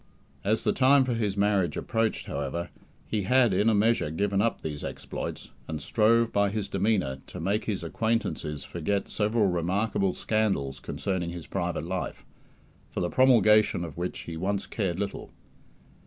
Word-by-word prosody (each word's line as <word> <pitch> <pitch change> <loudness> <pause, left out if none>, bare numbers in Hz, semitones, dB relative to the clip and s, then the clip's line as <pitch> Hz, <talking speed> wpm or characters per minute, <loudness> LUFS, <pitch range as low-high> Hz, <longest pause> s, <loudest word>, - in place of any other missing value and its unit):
As 110 +3 +1
the - - +2
time 135 +1 +5
for 130 -1 -1
his 105 -4 -1
marriage 100 -5 +2
approached, 115 -1 -1
however, 70 +5 -4 0.3
he 110 - -1
had 120 +2 +4
in 105 +4 +3
a 110 - +3
measure 110 -5 +2
given 100 +5 0
up 115 +1 0
these 75 -2 -4
exploits, - - -6 0.2
and 80 -1 -4
strove, 115 +4 +2
by 100 0 +3
his 100 0 -3
demeanour, 95 -9 0
to 90 - -8
make 100 +6 0
his 100 -5 -2
acquaintances 85 -6 -1
forget 95 +4 -2
several 105 +1 +1
remarkable 95 +2 0
scandals 95 -12 0
concerning 95 -3 -3
his 85 -1 -7
private 90 -3 -2
life, 90 +1 -4 0.6
for - - -4
the 85 - 0
promulgation 110 -7 +5
of 80 -5 -8
which 90 +1 -4
he 85 - -7
once 95 +4 -1
cared 95 -5 -2
little. 100 - -4
100 Hz, 160 wpm, -27 LUFS, 85-110 Hz, 0.6 s, time